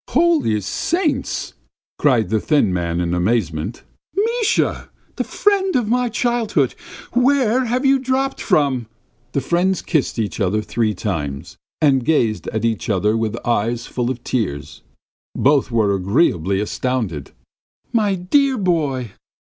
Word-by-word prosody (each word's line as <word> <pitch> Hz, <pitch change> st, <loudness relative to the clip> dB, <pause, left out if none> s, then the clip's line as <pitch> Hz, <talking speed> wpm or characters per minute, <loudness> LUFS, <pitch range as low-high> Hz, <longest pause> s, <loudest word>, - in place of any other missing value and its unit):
"Holy 305 Hz, -, +2 dB
saints!" 295 Hz, -, -1 dB, 0.5 s
cried 120 Hz, -9 st, +3 dB
the 110 Hz, +1 st, +1 dB
thin 140 Hz, -, +2 dB
man 85 Hz, -1 st, -1 dB
in 85 Hz, -1 st, -1 dB
amazement. 90 Hz, -1 st, -1 dB, 0.3 s
"Misha! 455 Hz, +2 st, 0 dB, 0.3 s
The -, -, 0 dB
friend 390 Hz, -3 st, +1 dB
of 245 Hz, -4 st, +1 dB
my 245 Hz, +2 st, +1 dB
childhood! 230 Hz, -, 0 dB, 0.4 s
Where 255 Hz, -1 st, +3 dB
have 250 Hz, +4 st, -1 dB
you 270 Hz, 0 st, +4 dB
dropped 265 Hz, +1 st, -1 dB
from?" 140 Hz, -, +1 dB, 0.5 s
The 140 Hz, -, 0 dB
friends 175 Hz, +6 st, 0 dB
kissed 155 Hz, -8 st, 0 dB
each 110 Hz, -1 st, -2 dB
other 105 Hz, +2 st, +1 dB
three 105 Hz, 0 st, -1 dB
times, 75 Hz, -9 st, -4 dB, 0.2 s
and 135 Hz, -5 st, +3 dB
gazed 120 Hz, -8 st, +1 dB
at 110 Hz, +1 st, -2 dB
each 115 Hz, -2 st, -1 dB
other 105 Hz, +2 st, +2 dB
with 115 Hz, 0 st, -1 dB
eyes 120 Hz, +1 st, 0 dB
full 120 Hz, -1 st, -2 dB
of 125 Hz, -2 st, -4 dB
tears. 75 Hz, -, -3 dB, 0.5 s
Both 140 Hz, -2 st, +3 dB
were 110 Hz, -4 st, +2 dB
agreeably 95 Hz, -, +1 dB
astounded. 105 Hz, -, -2 dB, 0.6 s
"My 210 Hz, -4 st, +2 dB
dear 265 Hz, +9 st, +2 dB
boy!" 150 Hz, -, 0 dB
130 Hz, 135 wpm, -20 LUFS, -, 0.6 s, you